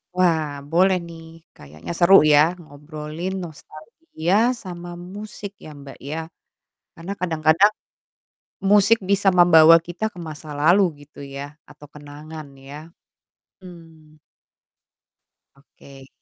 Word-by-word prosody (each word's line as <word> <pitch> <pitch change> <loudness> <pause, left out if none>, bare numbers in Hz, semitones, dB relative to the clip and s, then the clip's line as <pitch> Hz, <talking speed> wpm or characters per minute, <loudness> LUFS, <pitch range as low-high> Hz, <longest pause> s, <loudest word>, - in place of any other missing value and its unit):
Wah 170 -4 +2 0.2
boleh 185 +2 +3
nih 165 -1 -12 0.3
kayaknya 75 - -11
seru 180 +3 +6
ya 150 -1 +5 0.2
ngobrolin 155 +3 -8
nostalgia 170 - -6 0.3
sama 175 -1 -8
musik 200 +3 -9
ya - - -10
Mbak 140 -1 -12
ya 155 - -4 0.8
karena 170 +4 -7
kadang-kadang 165 +3 +2 1.0
musik 210 +2 +5
bisa 200 0 +1
membawa 165 -2 +7
kita 175 +5 -8
ke 175 - -12
masa 155 0 -10
lalu 175 +7 +4 0.2
gitu 150 - -18
ya 140 0 -8 0.3
atau 150 - -15
kenangan 150 +1 -11
ya, 150 +4 -12 0.7
mmm. 160 -4 -16 1.4
Oke. 135 -1 -17
160 Hz, 105 wpm, -21 LUFS, 150-180 Hz, 1.4 s, membawa